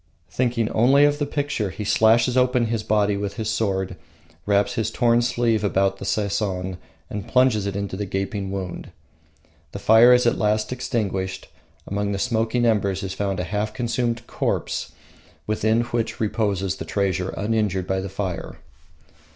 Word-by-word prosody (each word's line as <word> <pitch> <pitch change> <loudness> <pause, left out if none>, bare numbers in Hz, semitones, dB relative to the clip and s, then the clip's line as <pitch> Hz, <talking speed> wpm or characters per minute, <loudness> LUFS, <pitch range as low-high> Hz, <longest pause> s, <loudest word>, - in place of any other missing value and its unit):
Thinking 120 -3 0
only 135 +6 +5
of 145 0 +1
the 145 - -1
picture, 140 -8 -2
he 100 +3 -6
slashes 115 +4 +3
open 125 -1 +3
his 115 -1 -1
body 105 -1 +1
with 100 0 -4
his 110 -2 -2
sword, 95 -4 -1 0.5
wraps 100 0 +2
his 110 -1 -1
torn 120 0 +3
sleeve 120 -3 +1
about 95 -1 +1
the - - -6
Sesson 95 -3 -1 0.3
and 105 -2 -5
plunges 125 -6 +3
it 100 - -3
into 100 -2 -3
the 100 +1 -4
gaping 95 +1 -3
wound. 95 -3 -5 0.8
The - - -4
fire 115 +3 +6
is 125 0 +5
at 120 - +2
last 105 +2 +1
extinguished. 95 -6 -3 0.4
Among 100 +1 -2
the - - -2
smoking 115 +1 0
embers 100 -4 +1
is 95 -1 -4
found 100 -1 -2
a - - -1
half 105 +3 -3
consumed 120 -1 -1
corpse, - - -2 0.5
within 110 +2 +1
which 120 -1 -3
reposes 100 -4 -1
the - - -6
treasure 95 -2 -1
uninjured 105 -3 0
by 95 0 -1
the 95 +1 -4
fire. 95 -2 -4
105 Hz, 160 wpm, -23 LUFS, 95-115 Hz, 0.8 s, fire